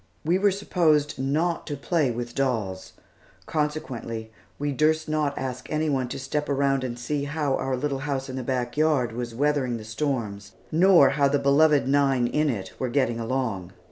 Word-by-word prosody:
We 175 +4 +2
were 205 +1 +4
supposed 165 -8 +1
not 155 +6 0
to 145 -3 -3
play 150 0 +1
with 120 0 -4
dolls, 110 -9 -2 0.5
consequently 125 -7 -3 0.3
we 145 0 -1
durst 155 +3 +1
not 155 -2 0
ask 130 -1 -5
any 155 0 0
one 130 -2 0
to - - -5
step 150 +3 -3
around 135 -1 +1
and 120 -2 -4
see 140 +4 -2
how 145 -1 -1
our 130 -1 -1
little 140 +1 -2
house 135 -1 -3
in 130 - -6
the 130 - -3
back 125 -1 -2
yard 150 -7 +2
was 120 0 -5
weathering 140 -3 +1
the 110 - -8
storms, 110 -5 -3 0.2
nor 170 -3 +6
how 140 0 +3
the 140 +1 +2
beloved 140 +1 +4
nine 135 -3 +3
in 150 +5 +1
it 100 -7 -4
were 130 - -1
getting 120 -3 +1
along. 115 -7 -2
135 Hz, 180 wpm, -25 LUFS, 120-150 Hz, 0.5 s, nor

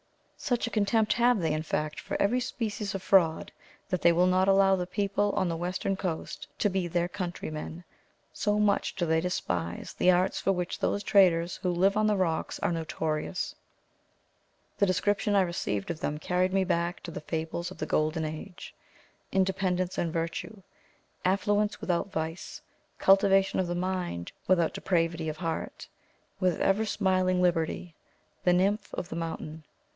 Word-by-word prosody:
Such 245 -3 -1
a 235 - -5
contempt 215 +1 +2
have 240 -1 +3
they, 160 -3 0
in 155 - -1
fact, 155 -1 -2
for - - -4
every 225 +6 +2
species 215 -5 -3
of 195 - -4
fraud, 170 -5 +3 0.4
that 185 -3 -1
they 170 - +6
will 175 +2 +3
not 185 +1 +3
allow 195 0 +5
the 180 -1 -3
people 205 +1 0
on 185 - +1
the 165 - -1
western 180 +3 -2
coast 180 -4 -4
to - - +2
be 190 -3 -1
their 175 0 0
countrymen; 175 -2 -5 0.5
so 210 -1 0
much 205 -1 +1
do 180 -3 0
they 160 0 +2
despise 90 - -3
the 180 - +2
arts 180 +1 +3
for 195 - +1
which 180 -2 -2
those 205 - 0
traders 180 -4 +4
who 185 - -2
live 185 +3 +2
on 215 0 +3
the 210 - +3
rocks 170 -4 -1
are - - +1
notorious. 160 +1 -2 1.3
The 200 - +4
description 205 +3 +1
I 195 - +6
received 170 - -2
of 155 - -6
them 150 - -2
carried 180 +4 0
me 195 0 +2
back 170 -1 -1
to 170 - -6
the - - -6
fables 165 +2 -3
of 185 - -11
the - - -3
golden 155 +1 0
age: 155 +4 -7 0.6
independence 185 -1 0
and 170 - 0
virtue; 170 +5 -4 0.6
affluence 205 +3 +1
without 180 +2 -1
vice; 160 +2 -4 0.4
cultivation 195 0 +4
of 180 -2 0
mind, 180 - -3 0.2
without 170 -3 +3
depravity 165 -3 0
of 155 - -5
heart; 165 -1 -4 0.5
with 185 -3 +1
"ever 205 +3 +2
smiling 185 -3 +1
Liberty;" 170 0 0 0.5
the 180 - +4
nymph 195 +3 +1
of 175 - -5
the - - -5
mountain. 160 -1 -5
180 Hz, 165 wpm, -28 LUFS, 165-195 Hz, 1.3 s, they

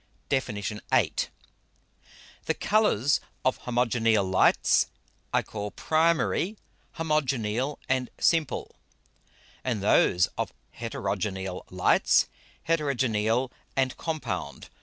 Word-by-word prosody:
DEFIN. 130 -5 0
VIII. 105 +1 0 1.3
_The - - 0
Colours 170 - +3 0.3
of 130 - +2
Homogeneal 115 -3 +2
Lights, 95 0 +4 0.4
I - - +2
call 105 -1 -5
Primary, 165 - +1 0.4
Homogeneal 135 -5 0
and 130 -1 0
Simple; 160 -4 +1 0.9
and 115 -6 -1
those 90 -3 +4
of - - -2 0.2
Heterogeneal 95 -3 -3
Lights, 90 0 +3 0.4
Heterogeneal 130 -6 +1 0.2
and 130 -1 +1
Compound. 135 - -4
125 Hz, 85 wpm, -27 LUFS, 105-150 Hz, 1.3 s, Lights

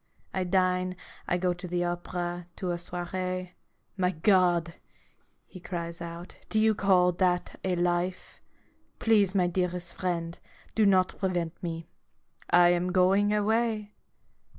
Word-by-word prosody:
I 185 -1 -1
dine, 185 0 +1 0.3
I 175 - +1
go 180 0 +1
to 180 +1 -8
the 175 0 -1
opera, 175 0 -3
to 180 -2 -3
a 175 - -2
soiree. 180 +1 -4 0.5
My 180 -1 +2
God!' 175 -2 +2 0.7
he 185 - -12
cries 170 -1 -5
out, 170 +1 -8
"do 220 - +1
you 220 0 +4
call 185 -3 +4
that 180 0 0
a 185 -1 0
life? 175 +1 -1 0.6
Please, 205 -4 +3
my 185 -2 +4
dearest 175 -1 -2
friend, 170 -2 -3 0.3
do 215 -2 +3
not 185 -2 +2
prevent 175 -4 -2
me. 165 -2 -4 0.6
I 175 0 +6
am 175 +1 +1
going 195 +3 +3
away." 215 0 +1
180 Hz, 135 wpm, -28 LUFS, 175-190 Hz, 0.7 s, I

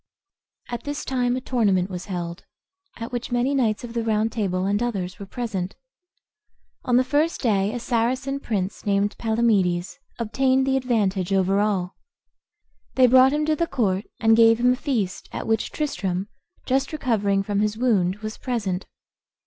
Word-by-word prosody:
At 240 -1 -4
this 290 0 -4
time 250 -2 0
a 255 - -3
tournament 205 -8 +1
was 180 -1 -5
held, 175 -2 -5 0.5
at 230 +2 -6
which 245 -1 -4
many 245 +3 +1
knights 235 -5 +1
of 235 -1 -7
the 235 -1 -1
Round 220 0 +1
Table, 190 -5 -1
and 205 +2 0
others, 195 -6 -3
were 200 - -8
present. 200 -5 -4 1.1
On 245 -1 +3
the 255 - +4
first 295 +6 +1
day 205 -4 +2
a 245 - -4
Saracen 255 +4 -1
prince, 200 -7 -3
named 205 0 +1
Palamedes, 210 -5 +1 0.2
obtained 260 +3 +1
the 270 0 +1
advantage 205 -8 0
over 195 0 +2
all. 195 -3 0 1.0
They 260 - +6
brought 260 +2 +6
him 300 +1 0
to 310 0 +2
the 335 +2 0
court, 200 - 0
and 225 0 +5
gave 225 0 +6
him 250 +1 +4
a - - -1
feast, 240 - -2
at - - -5
which 225 -1 0
Tristram, 195 - -2 0.4
just 270 +1 0
recovering 210 -9 0
from 200 0 -1
his 210 +1 0
wound, 200 -7 +2
was 215 0 -5
present. 205 -8 -2
225 Hz, 165 wpm, -24 LUFS, 195-255 Hz, 1.1 s, They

